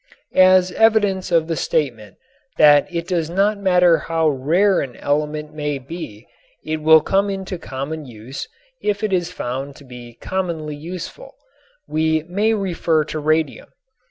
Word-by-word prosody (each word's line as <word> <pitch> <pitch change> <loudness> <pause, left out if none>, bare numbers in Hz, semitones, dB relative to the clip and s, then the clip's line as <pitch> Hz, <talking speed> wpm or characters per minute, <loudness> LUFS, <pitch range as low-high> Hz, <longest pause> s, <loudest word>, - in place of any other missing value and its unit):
As 185 0 +5
evidence 205 -4 +2
of 165 -2 +3
the 165 0 -2
statement 115 -11 -2 0.4
that 145 -1 +6
it 170 0 -3
does 170 -4 -1
not 200 +4 +1
matter 180 -3 +4
how 165 -1 0
rare 170 +9 +2
an 125 -4 -6
element 150 +1 -2
may 150 -2 -2
be 130 -6 -9 0.4
it 155 0 -2
will 160 0 +7
come 195 +4 +1
into 190 -2 -5
common 140 +2 -6
use 120 +3 -8 0.3
if 205 0 -1
it 210 -2 0
is 175 -1 0
found 135 -2 -5
to - - -15
be 120 -2 -12
commonly 165 -5 -4
useful, 180 - -8 0.5
we 160 0 0
may 205 +6 0
refer 170 -5 0
to 155 - -5
radium. 155 -1 0
160 Hz, 150 wpm, -20 LUFS, 145-185 Hz, 0.5 s, will